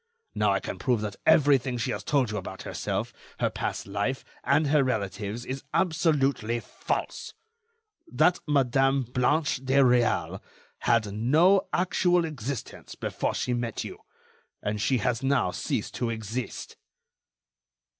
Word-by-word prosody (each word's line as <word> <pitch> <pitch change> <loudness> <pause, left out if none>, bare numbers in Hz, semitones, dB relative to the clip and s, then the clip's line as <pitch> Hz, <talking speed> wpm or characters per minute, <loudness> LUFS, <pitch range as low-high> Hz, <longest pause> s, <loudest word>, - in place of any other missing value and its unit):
Now, - - +2
I - - +2
can - - -6
prove 125 -5 +1
that 105 -2 -4
everything 140 -5 +4
she 115 - -1
has 100 - -4
told 130 -2 +1
you 105 - -3
about 95 -1 -6
herself, - - -3 0.3
her - - +1
past - - -3
life, 105 +7 -2 0.2
and 155 - +3
her 145 0 +3
relatives, 110 -1 -3
is 135 +1 -5
absolutely 140 - +1
false; - - -4 0.8
that 175 +3 +3
Madame 135 -1 +3
Blanche 135 +4 0
de 135 +1 0
Réal 125 -3 +3 0.4
had 110 -4 +1
no 160 - +4
actual 180 -1 +2
existence 140 -5 -6
before - - -2
she 125 - -1
met 120 -2 -2
you, - - -8 0.6
and 105 0 -2
she 130 +4 +2
has 120 +1 0
now 135 +1 +2
ceased - - -3
to 120 - -2
exist." 115 +2 -5
130 Hz, 135 wpm, -27 LUFS, 115-145 Hz, 0.8 s, everything